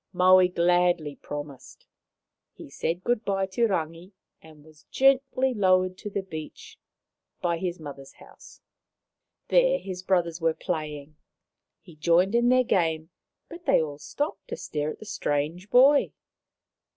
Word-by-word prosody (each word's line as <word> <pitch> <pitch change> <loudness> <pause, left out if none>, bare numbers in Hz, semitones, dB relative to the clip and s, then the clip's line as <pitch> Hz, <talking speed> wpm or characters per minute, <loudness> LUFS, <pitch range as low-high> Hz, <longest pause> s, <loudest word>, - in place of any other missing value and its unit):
Maui 185 0 +6
gladly 175 -3 +1
promised. 145 -2 -9 0.7
He - - -12
said 175 +3 -3
good 240 -2 0
bye 195 -1 0
to 215 +5 0
Rangi 170 0 -4 0.3
and 155 -2 -17
was 155 -1 -20
gently 265 -1 +2
lowered 185 -3 +2
to 210 - -6
the 200 -1 -3
beach 160 -5 -10 0.6
by 170 -1 -1
his 180 -1 -3
mother's 140 -3 -10
house. - - -17 0.9
There - - +4
his 185 -2 -7
brothers 175 -3 0
were 165 -1 +1
playing. 155 -4 -5 0.7
He 170 - -15
joined 170 +5 +2
in 240 +1 +3
their 255 0 +4
game, 165 -6 0 0.4
but 340 +1 -12
they - - +5
all 150 -2 -4
stopped 290 - -4
to 475 0 -6
stare 150 - -3
at - - -7
the - - -12
strange 165 0 -3
boy. 275 +5 +5
180 Hz, 140 wpm, -26 LUFS, 155-210 Hz, 0.9 s, Maui